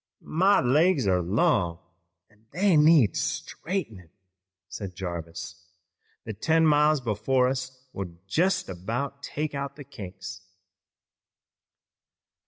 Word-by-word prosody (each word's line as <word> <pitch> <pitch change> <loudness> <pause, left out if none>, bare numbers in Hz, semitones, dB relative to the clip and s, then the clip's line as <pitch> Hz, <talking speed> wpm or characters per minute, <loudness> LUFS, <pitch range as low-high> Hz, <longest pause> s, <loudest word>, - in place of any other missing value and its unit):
"My 190 +5 +4
legs 150 - +3
are 90 -2 +2
long 95 - +1 0.5
an' 105 +1 -29
they 185 - +2
need 150 -6 +6
straightenin'," 110 - -4 0.6
said 95 -2 -7
Jarvis. 85 -1 -6 0.6
"The 110 - -5
ten 160 +10 +2
miles 150 0 +4
before 125 +2 +1
us 130 0 -4
will 90 -3 -6
jest 180 - +1
about 115 +10 -4
take 150 +1 -4
out 140 0 -4
the 145 - -9
kinks." 95 -5 -9
125 Hz, 105 wpm, -26 LUFS, 95-150 Hz, 0.6 s, need